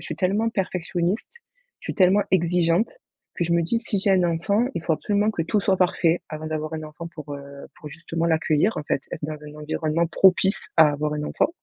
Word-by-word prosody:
suis - - -5
tellement 200 +5 +1
perfectionniste, 180 -1 -2 0.5
je - - -11
suis - - -3
tellement 195 +1 +4
exigeante, 175 +2 +2 0.4
que 175 - -1
je 170 - -1
me 170 - +3
dis: 230 +8 0
«Si 220 -3 -1
j'ai 195 +1 +2
un 185 -2 +3
enfant, 175 +7 +1
il 165 - -3
faut 160 0 +1
absolument 205 +5 0
que 185 -6 -2
tout 205 +6 0
soit 195 -1 +2
parfait 175 -2 +2
avant 155 0 -6
d'avoir 155 0 -3
un 155 0 -5
enfant 155 +2 -8
pour, 150 -2 -7
heu, 140 - -7 0.4
pour 150 - -9
justement, 165 +2 -4
l'accueillir, 160 +4 +2
en - - -3
fait, 135 - -1
être 155 - -5
dans 155 - -4
un 150 0 -11
environnement 155 +2 -1
propice 190 +4 +3
à 160 - +8
avoir 150 +1 -2
un 150 - -3
enfant». - - +1
170 Hz, 215 wpm, -24 LUFS, 155-190 Hz, 0.5 s, à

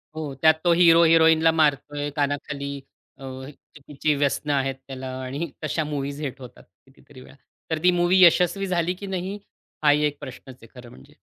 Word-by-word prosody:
हो, 155 -3 -5
त्यात 160 0 +6
तो 175 - +3
हिरो 170 -1 +5
हिरोईनला 160 0 +5
मारतोय 145 -2 0
कानाखाली, 140 -1 -3 0.5
अ, 135 - -14
हे 130 +1 -8
चुकीची 150 +1 -4
व्यसनं 145 +1 -1
आहेत 135 -1 -1
त्याला 130 -1 -7 0.2
आणि 140 +6 -5
तशा 155 +1 -1
मूव्हीज 145 -1 -5
हिट 140 -2 -5
होतात 125 - -13 0.2
कितीतरी 135 0 -18
वेळा. 135 - -16 0.4
तर 160 - 0
ती 180 - +5
मूव्ही 185 +1 +4
यशस्वी 180 +3 +3
झाली 175 0 0
की 200 +2 -9
नाही, 190 +1 -4 0.5
हाही 150 0 +4
एक 145 -1 -2
प्रश्नच 130 0 -10
आहे 120 +3 -15
खरं 120 - -12
म्हणजे. 65 - -17
150 Hz, 175 wpm, -23 LUFS, 135-165 Hz, 0.5 s, त्यात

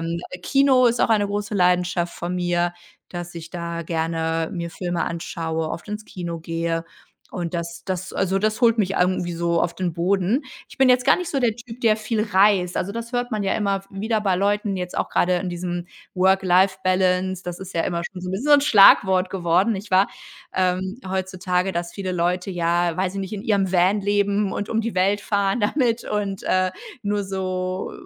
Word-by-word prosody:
ähm, 165 +1 -3
äh, 180 - -7
Kino 270 +3 +4
ist 240 0 +1
auch - - +2
eine 210 -2 +3
große 205 +1 -3
Leidenschaft 180 -2 +2
von 175 +1 -4
mir, 175 -1 0 0.4
dass 175 -1 -7
ich 165 0 -8
da 170 -1 -4
gerne 165 0 -1
mir 170 -2 -4
Filme 175 0 -2
anschaue, 160 -1 -3
oft 165 - -6
ins 210 +1 -5
Kino 170 -4 -6
gehe, 165 0 -2 0.5
und 175 -2 -4
das 170 -1 -5
das 185 -1 -4
also, 195 0 0
das 215 +3 0
holt 235 -2 +4
mich 195 -2 +1
irgendwie 180 -1 +1
so 170 0 0
auf 170 0 -1
den 180 -2 -2
Boden. 190 - +1 0.3
Ich - - -15
bin 265 -1 +5
jetzt 250 0 +4
gar 275 - +5
nicht 360 -2 -4
so 275 - -1
der 240 -2 +3
Typ, 235 0 -11
der 220 -3 +3
viel 215 0 -1
reist. 195 -3 +3
Also, 200 - -2
das 230 +1 -6
hört 245 0 -2
man 215 -1 -1
ja 195 - 0
immer 200 -2 0
w 195 0 -7
wieder 220 0 +1
bei 195 -3 +1
Leuten, 205 +1 0
jetzt 180 -1 -5
auch - - -1
grade 180 +1 +2
in 185 - -4
diesem 175 0 -4 0.3
Work-Life-Balance. 185 0 +2
Das 175 -1 -6
ist 190 -1 -9
ja 165 - +1
immer 170 0 -2
schon 180 0 -7
so 180 - -6
'n - - -3
wie - - -1
so 285 +7 -2
'n 290 - +8
Schlagwort 195 -7 +6
geworden, 185 +3 +2
nicht 205 +1 -6
wahr? 190 +2 +5 0.5
Ähm, 185 +4 0
heutzutage, 185 0 -1
dass 170 0 -3
viele 190 -2 -4
Leute 180 +2 -1
ja 170 -1 +1
weiß 185 0 -1
ich 195 - -3
nicht, 195 +1 -6
in 205 -2 -4
ihrem 195 -4 +1
Van 185 +3 +3
leben 200 0 +1
und 205 - -3
um 225 - 0
die 225 -1 -3
Welt 195 +3 +2
fahren 200 0 0
damit 235 +1 +1
und, 200 -2 -3
äh, 185 0 +2 0.3
nur 205 -1 -1
so 185 -1 -3
185 Hz, 205 wpm, -23 LUFS, 175-205 Hz, 0.5 s, n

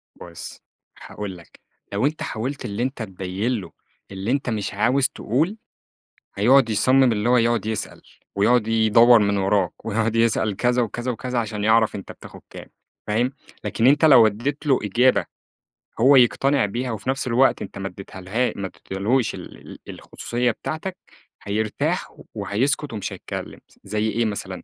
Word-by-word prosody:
بُص 85 -1 -10 0.4
هاقول 100 -3 -7
لك، 85 - -18 0.3
لو 105 +7 +1
أنت 155 +2 -1
حاولت 130 +4 -4
اللي 105 +2 -3
أنت 130 -2 -3
تبين 95 +4 -3
له - - -11 0.4
اللي 95 +5 -3
أنت 135 -3 -1
مش 105 -4 -3
عاوز 130 +6 +2
تقول، 160 - -1 0.8
هيقعد 120 +4 +4
يصمّم 130 +4 +4
اللي 110 +2 0
هو 125 - +5
يقعد 115 -2 +1
يسأل، 110 -2 -4 0.3
ويقعد 110 +2 +3
يدوّر 115 +1 +5
من 100 -1 +1
وَرَاك، 95 -2 0
ويقعد 115 +2 0
يسأل 110 -3 +1
كذا 125 +2 +1
وكذا 120 +2 -3
وكذا 125 +1 -3
عشان 105 -2 -3
يعرف 110 0 +3
أنت 100 - -7
بتاخد - - -13
كام - - -10 0.4
فاهم؟ 120 +5 +1 0.3
لكن 115 +2 +1
أنت 145 +3 +5
لو 120 -7 +8
اديت 135 +9 -3
له 135 - +4
إجابة 120 +6 +2 0.7
هو 135 +4 +6
يقتنع 135 0 +4
بيها 120 +4 -3
وفي 110 +3 -5
نفْس 135 -1 -1
الوقت 125 +3 +3
أنت 100 - -7
ما 95 0 -4
اديتهالها 95 +5 -3
ما 100 -1 -4
اديتهالهوش 110 +8 -1
ال - - -10
ال - - -11
الخصوصية 120 0 -2
بتاعتك 170 +9 -5 0.5
هيرتاح 105 +1 -2
و - - -16
وهيسكت 135 +5 -1
ومش 105 -1 -4
هيتكلّم 95 - -7
س - - -26
زي 110 +1 -1
إيه 115 +1 0
مثلًا 95 -3 -5
115 Hz, 160 wpm, -22 LUFS, 105-125 Hz, 0.8 s, لو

